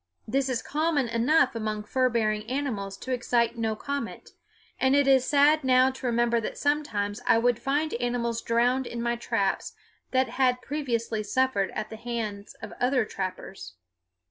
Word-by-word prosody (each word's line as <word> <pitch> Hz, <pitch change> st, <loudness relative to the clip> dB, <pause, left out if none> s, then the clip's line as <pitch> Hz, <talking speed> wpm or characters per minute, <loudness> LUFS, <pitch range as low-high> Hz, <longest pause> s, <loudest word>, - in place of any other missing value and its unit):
This 265 Hz, +4 st, 0 dB
is 240 Hz, -3 st, -1 dB
common 305 Hz, -3 st, 0 dB
enough 250 Hz, +5 st, +3 dB
among 215 Hz, -2 st, -3 dB
fur 255 Hz, +3 st, +1 dB
bearing 215 Hz, -2 st, -1 dB
animals 225 Hz, -8 st, -3 dB
to 260 Hz, -, -7 dB
excite 240 Hz, -1 st, +1 dB
no 225 Hz, -2 st, -1 dB
comment; 280 Hz, 0 st, -5 dB, 0.5 s
and 265 Hz, +1 st, +3 dB
it 285 Hz, -1 st, +3 dB
is 265 Hz, -2 st, +4 dB
sad 295 Hz, +1 st, +4 dB
now 260 Hz, 0 st, +4 dB
to 260 Hz, -1 st, -5 dB
remember 235 Hz, 0 st, +2 dB
that -, -, -5 dB
sometimes 220 Hz, -9 st, -1 dB
I 230 Hz, -, +5 dB
would 240 Hz, 0 st, +2 dB
find 295 Hz, +3 st, -1 dB
animals 235 Hz, -1 st, -1 dB
drowned 245 Hz, +3 st, +1 dB
in 235 Hz, -, -5 dB
my 235 Hz, 0 st, 0 dB
traps, 230 Hz, -5 st, -1 dB, 0.4 s
that 260 Hz, 0 st, +2 dB
had 250 Hz, 0 st, +1 dB
previously 235 Hz, -7 st, -2 dB
suffered 215 Hz, -1 st, +1 dB
at 215 Hz, -, -4 dB
the 220 Hz, -, -7 dB
hands 220 Hz, -4 st, -5 dB
of -, -, -7 dB
other 250 Hz, -2 st, +2 dB
trappers. 185 Hz, -, -6 dB
240 Hz, 165 wpm, -27 LUFS, 225-265 Hz, 0.5 s, I